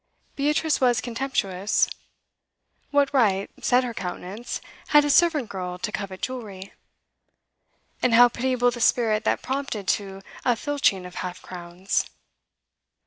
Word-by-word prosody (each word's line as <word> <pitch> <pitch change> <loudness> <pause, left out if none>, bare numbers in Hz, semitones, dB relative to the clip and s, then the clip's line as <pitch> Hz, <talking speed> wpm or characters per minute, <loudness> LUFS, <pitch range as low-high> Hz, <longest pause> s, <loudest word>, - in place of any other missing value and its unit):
Beatrice 300 +1 +1
was 245 -3 +4
contemptuous. 225 -6 0 1.0
What 285 -1 +2
right, 200 -7 +2
said 250 +1 +4
her 245 -2 -4
countenance, 195 +4 -5 0.3
had 295 -1 +5
a 290 - +2
servant 310 -7 +3
girl 180 -2 -5
to 210 +4 -4
covet 195 -3 -6
jewellery? 205 -7 -6 1.3
And 245 -2 +3
how 245 +1 +9
pitiable 245 0 +1
the 240 0 -6
spirit 225 -2 +2
that - - +1
prompted 260 -7 -3
to 195 -1 -2 0.2
a 245 -2 +3
filching 250 -9 0
of 180 - -9
half 180 -1 -6
crowns! 180 +1 -3
230 Hz, 130 wpm, -25 LUFS, 195-260 Hz, 1.3 s, how